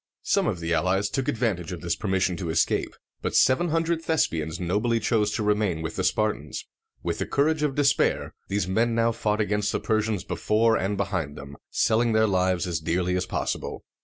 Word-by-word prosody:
Some -, -, +2 dB
of 90 Hz, -, -1 dB
the 85 Hz, 0 st, -1 dB
allies 95 Hz, +5 st, +1 dB
took 135 Hz, -2 st, -1 dB
advantage 105 Hz, -7 st, -1 dB
of 90 Hz, -, -6 dB
this 85 Hz, -1 st, -1 dB
permission 95 Hz, -2 st, 0 dB
to 85 Hz, -2 st, -4 dB
escape, 80 Hz, +1 st, +1 dB, 0.3 s
but -, -, -2 dB
seven 150 Hz, +7 st, +4 dB
hundred 165 Hz, +1 st, 0 dB
Thes´pi 155 Hz, -, +1 dB
ans 80 Hz, +2 st, -5 dB
nobly 105 Hz, +7 st, +1 dB
chose 110 Hz, -1 st, +1 dB
to 110 Hz, -, -1 dB
remain 105 Hz, -6 st, +1 dB
with 80 Hz, +1 st, -4 dB
the 95 Hz, -, -1 dB
Spartans. 100 Hz, -8 st, -1 dB, 0.4 s
With -, -, -2 dB
the -, -, -2 dB
courage 150 Hz, +2 st, +1 dB
of 145 Hz, -3 st, 0 dB
despair, 145 Hz, -1 st, +2 dB
these 100 Hz, -1 st, -1 dB
men 115 Hz, +5 st, +1 dB
now 115 Hz, 0 st, +3 dB
fought 105 Hz, -2 st, -1 dB
against 105 Hz, 0 st, 0 dB
the -, -, -1 dB
Persians 110 Hz, -2 st, 0 dB
before 110 Hz, +1 st, +2 dB
and 100 Hz, -1 st, -1 dB
behind 95 Hz, -7 st, -2 dB
them, 70 Hz, 0 st, -9 dB
selling 115 Hz, +1 st, +2 dB
their 110 Hz, 0 st, +4 dB
lives 95 Hz, -3 st, +1 dB
as 85 Hz, -3 st, -2 dB
dearly 90 Hz, +3 st, 0 dB
as 90 Hz, 0 st, -1 dB
possible. -, -, -3 dB
105 Hz, 195 wpm, -26 LUFS, 90-115 Hz, 0.4 s, seven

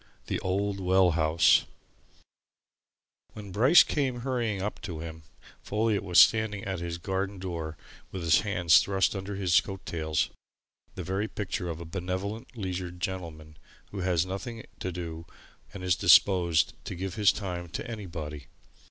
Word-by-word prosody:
THE -, -, -2 dB
OLD 100 Hz, +1 st, -1 dB
WELL 95 Hz, -1 st, +4 dB
HOUSE 80 Hz, 0 st, +4 dB, 1.7 s
When 105 Hz, -2 st, -9 dB
Bryce 125 Hz, -, +7 dB
came 130 Hz, -5 st, -1 dB
hurrying 120 Hz, -6 st, -1 dB
up 100 Hz, +3 st, -4 dB
to 85 Hz, -4 st, -6 dB
him, 80 Hz, 0 st, -7 dB, 0.4 s
Folliot 105 Hz, 0 st, 0 dB
was 90 Hz, -3 st, +4 dB
standing 110 Hz, -3 st, +4 dB
at 95 Hz, -2 st, -3 dB
his 85 Hz, 0 st, -4 dB
garden 95 Hz, +3 st, -3 dB
door 85 Hz, -4 st, -5 dB, 0.3 s
with 95 Hz, -3 st, -6 dB
his 80 Hz, -2 st, +4 dB
hands 90 Hz, -5 st, +4 dB
thrust 95 Hz, +1 st, +1 dB
under 95 Hz, +1 st, -5 dB
his 95 Hz, -3 st, +3 dB
coat 95 Hz, -1 st, -8 dB
tails 80 Hz, -2 st, -1 dB, 0.6 s
the -, -, -5 dB
very 95 Hz, +3 st, -2 dB
picture 95 Hz, -4 st, -4 dB
of 80 Hz, -1 st, -5 dB
a 85 Hz, -, -7 dB
benevolent, 95 Hz, +7 st, -5 dB
leisured 90 Hz, -3 st, -4 dB
gentleman 80 Hz, -4 st, -6 dB, 0.3 s
who 100 Hz, -, -6 dB
has 90 Hz, -2 st, +1 dB
nothing 110 Hz, +5 st, -6 dB
to 95 Hz, -, -3 dB
do 85 Hz, -2 st, -6 dB, 0.4 s
and 100 Hz, -2 st, -8 dB
is 90 Hz, -2 st, +2 dB
disposed 85 Hz, -5 st, +4 dB
to -, -, -5 dB
give 95 Hz, +1 st, -4 dB
his 105 Hz, 0 st, +4 dB
time 90 Hz, -4 st, -5 dB
to -, -, -5 dB
anybody. 85 Hz, -, -7 dB
95 Hz, 150 wpm, -28 LUFS, 85-100 Hz, 1.7 s, Bryce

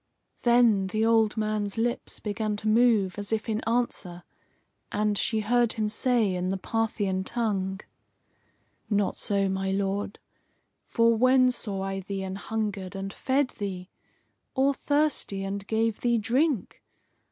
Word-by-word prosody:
Then 235 Hz, -5 st, +4 dB
the 215 Hz, +3 st, 0 dB
old 225 Hz, -1 st, +3 dB
man's 215 Hz, -1 st, -1 dB
lips 235 Hz, +1 st, -1 dB
began 210 Hz, 0 st, -2 dB
to 215 Hz, +1 st, -4 dB
move, 215 Hz, -4 st, +3 dB
as 205 Hz, +1 st, -5 dB
if 220 Hz, 0 st, -1 dB
in 220 Hz, -1 st, -1 dB
answer, 205 Hz, -7 st, -1 dB, 0.7 s
and 210 Hz, 0 st, +1 dB
she 220 Hz, +2 st, 0 dB
heard 240 Hz, +2 st, +2 dB
him 215 Hz, -1 st, -1 dB
say 220 Hz, -2 st, +1 dB
in 180 Hz, 0 st, -2 dB
the 195 Hz, -, -1 dB
Parthian 205 Hz, -2 st, -1 dB
tongue: 195 Hz, -4 st, -2 dB, 1.1 s
"Not 205 Hz, -2 st, +1 dB
so, 200 Hz, -1 st, 0 dB
my 190 Hz, 0 st, -1 dB
Lord! 195 Hz, +1 st, -1 dB, 0.7 s
For 230 Hz, 0 st, +3 dB
when 255 Hz, +2 st, +5 dB
saw 200 Hz, -5 st, -3 dB
I 195 Hz, 0 st, -3 dB
thee 195 Hz, 0 st, -4 dB
an 190 Hz, 0 st, -4 dB
hungered 205 Hz, -3 st, -3 dB
and 195 Hz, 0 st, -5 dB
fed 265 Hz, 0 st, +1 dB
thee? 190 Hz, -5 st, -6 dB, 0.6 s
Or 275 Hz, +1 st, +3 dB
thirsty, 285 Hz, -9 st, 0 dB
and 195 Hz, +1 st, -4 dB
gave 225 Hz, -1 st, 0 dB
thee 240 Hz, -1 st, +2 dB
drink? 245 Hz, -, 0 dB
215 Hz, 140 wpm, -27 LUFS, 195-230 Hz, 1.1 s, when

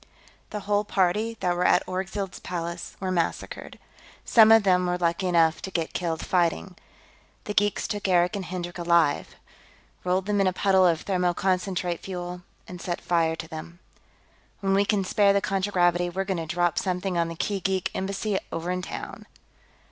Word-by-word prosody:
The 210 Hz, -, -5 dB
whole 205 Hz, +1 st, +1 dB
party 210 Hz, +3 st, 0 dB
that 175 Hz, -1 st, +1 dB
were 180 Hz, -, 0 dB
at -, -, +4 dB
Orgzild's 190 Hz, +1 st, -4 dB
palace 170 Hz, -1 st, -5 dB
were 185 Hz, -1 st, -2 dB
massacred. 170 Hz, -2 st, -3 dB, 0.5 s
Some 220 Hz, -2 st, +7 dB
of 225 Hz, -1 st, +7 dB
them 180 Hz, -2 st, +3 dB
were 180 Hz, 0 st, 0 dB
lucky 175 Hz, +2 st, 0 dB
enough 165 Hz, -2 st, +3 dB
to -, -, -5 dB
get 165 Hz, -3 st, -3 dB
killed 165 Hz, -3 st, -2 dB
fighting. 180 Hz, +1 st, 0 dB, 0.7 s
The 210 Hz, -, -4 dB
geeks 205 Hz, 0 st, +1 dB
took 205 Hz, -2 st, -3 dB
Eric 180 Hz, 0 st, +3 dB
and 195 Hz, -2 st, -4 dB
Hendrik 175 Hz, 0 st, -5 dB
alive; 170 Hz, -4 st, +2 dB, 0.7 s
rolled 180 Hz, +1 st, 0 dB
them 205 Hz, -1 st, +1 dB
in 195 Hz, -, +3 dB
a 185 Hz, -, +1 dB
puddle 190 Hz, -1 st, +4 dB
of 165 Hz, -2 st, 0 dB
thermoconcentrate 180 Hz, -1 st, 0 dB
fuel 180 Hz, -1 st, -6 dB, 0.3 s
and 180 Hz, -1 st, -9 dB
set 175 Hz, -1 st, -3 dB
fire 165 Hz, -2 st, +1 dB
to 160 Hz, -, -7 dB
them. 160 Hz, +1 st, -8 dB, 0.8 s
When 195 Hz, -1 st, +1 dB
we 200 Hz, +1 st, +3 dB
can 200 Hz, -1 st, +1 dB
spare 200 Hz, +1 st, +3 dB
the 200 Hz, -, +3 dB
contragravity, 180 Hz, -3 st, +1 dB
we're 190 Hz, +2 st, -2 dB
going 190 Hz, -1 st, -2 dB
to 165 Hz, -1 st, -4 dB
drop 175 Hz, +1 st, +1 dB
something 185 Hz, 0 st, -2 dB
on 170 Hz, -1 st, +1 dB
the 165 Hz, -, -6 dB
Kee 200 Hz, +4 st, -2 dB
geek 190 Hz, -1 st, -1 dB
embassy, 195 Hz, +1 st, -2 dB
over 170 Hz, +2 st, -3 dB
in 180 Hz, 0 st, -2 dB
town." -, -, -7 dB
180 Hz, 180 wpm, -26 LUFS, 175-195 Hz, 0.8 s, Some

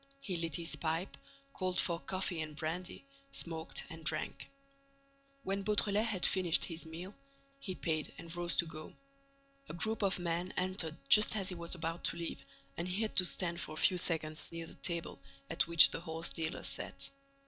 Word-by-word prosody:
He 200 Hz, -9 st, -4 dB
lit 165 Hz, -3 st, -2 dB
his 170 Hz, -1 st, +1 dB
pipe, 165 Hz, +3 st, -2 dB, 0.4 s
called 185 Hz, -1 st, -1 dB
for 170 Hz, -2 st, +1 dB
coffee 185 Hz, -2 st, -2 dB
and 155 Hz, -1 st, -6 dB
brandy, 170 Hz, -, -4 dB, 0.3 s
smoked 160 Hz, -1 st, -3 dB
and 165 Hz, 0 st, -10 dB
drank. 155 Hz, 0 st, 0 dB, 0.9 s
When 195 Hz, -1 st, -1 dB
Beautrelet 210 Hz, +1 st, +3 dB
had 195 Hz, -5 st, +2 dB
finished 180 Hz, -4 st, +4 dB
his 165 Hz, -1 st, -4 dB
meal, 175 Hz, +5 st, -7 dB, 0.5 s
he 190 Hz, -8 st, -5 dB
paid 155 Hz, -4 st, -2 dB
and 165 Hz, 0 st, -4 dB
rose 175 Hz, 0 st, -2 dB
to 170 Hz, -, +3 dB
go. 155 Hz, -1 st, -9 dB, 0.7 s
A -, -, -5 dB
group 220 Hz, +6 st, +1 dB
of 195 Hz, -2 st, +2 dB
men 175 Hz, +1 st, -2 dB
entered 180 Hz, -3 st, 0 dB
just 210 Hz, +1 st, +7 dB
as 195 Hz, -3 st, 0 dB
he 180 Hz, -, 0 dB
was 170 Hz, +1 st, -4 dB
about 165 Hz, 0 st, -4 dB
to -, -, 0 dB
leave 170 Hz, -1 st, -5 dB, 0.3 s
and 170 Hz, -, -2 dB
he 190 Hz, +5 st, -1 dB
had 220 Hz, -, -3 dB
to 185 Hz, -, +8 dB
stand 170 Hz, -1 st, +1 dB
for 155 Hz, -, -5 dB
a 155 Hz, -, +1 dB
few 185 Hz, -3 st, +4 dB
seconds 155 Hz, -3 st, +1 dB
near 165 Hz, 0 st, -5 dB
the -, -, -11 dB
table 170 Hz, -2 st, -1 dB, 0.3 s
at 165 Hz, -, +1 dB
which 170 Hz, -1 st, +8 dB
the -, -, -3 dB
horse 165 Hz, 0 st, -4 dB
dealer 160 Hz, -1 st, -3 dB
sat. -, -, -1 dB
170 Hz, 185 wpm, -34 LUFS, 165-185 Hz, 0.9 s, to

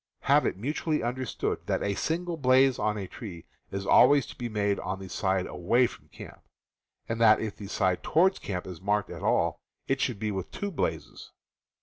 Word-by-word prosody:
Have -, -, +4 dB
it -, -, -2 dB
mutually 150 Hz, -, -1 dB
understood 125 Hz, -2 st, -2 dB
that -, -, 0 dB
a 100 Hz, -, 0 dB
single 170 Hz, -, -2 dB
blaze 130 Hz, -2 st, +4 dB
on 105 Hz, 0 st, 0 dB
a 100 Hz, -, -4 dB
tree 90 Hz, -7 st, -9 dB, 0.2 s
is 100 Hz, 0 st, -4 dB
always 140 Hz, +5 st, +6 dB
to -, -, -11 dB
be 120 Hz, -1 st, -5 dB
made 100 Hz, -2 st, 0 dB
on 95 Hz, +1 st, -3 dB
the 95 Hz, 0 st, -9 dB
side 95 Hz, 0 st, 0 dB
away 120 Hz, +8 st, +2 dB
from -, -, -8 dB
camp, -, -, -12 dB, 0.7 s
and 115 Hz, 0 st, -3 dB
that 110 Hz, -2 st, +6 dB
if 110 Hz, -2 st, -4 dB
the 100 Hz, -, -9 dB
side 95 Hz, -3 st, 0 dB
toward 185 Hz, +4 st, +2 dB
camp 90 Hz, -3 st, -4 dB
is 90 Hz, -3 st, -8 dB
marked 105 Hz, +1 st, 0 dB
at -, -, -8 dB
all -, -, +1 dB, 0.3 s
it 135 Hz, +1 st, 0 dB
should 125 Hz, -5 st, 0 dB
be 105 Hz, +1 st, -2 dB
with 95 Hz, -2 st, -4 dB
two 200 Hz, 0 st, -4 dB
blazes. 170 Hz, -, -4 dB
110 Hz, 200 wpm, -28 LUFS, 95-130 Hz, 0.7 s, always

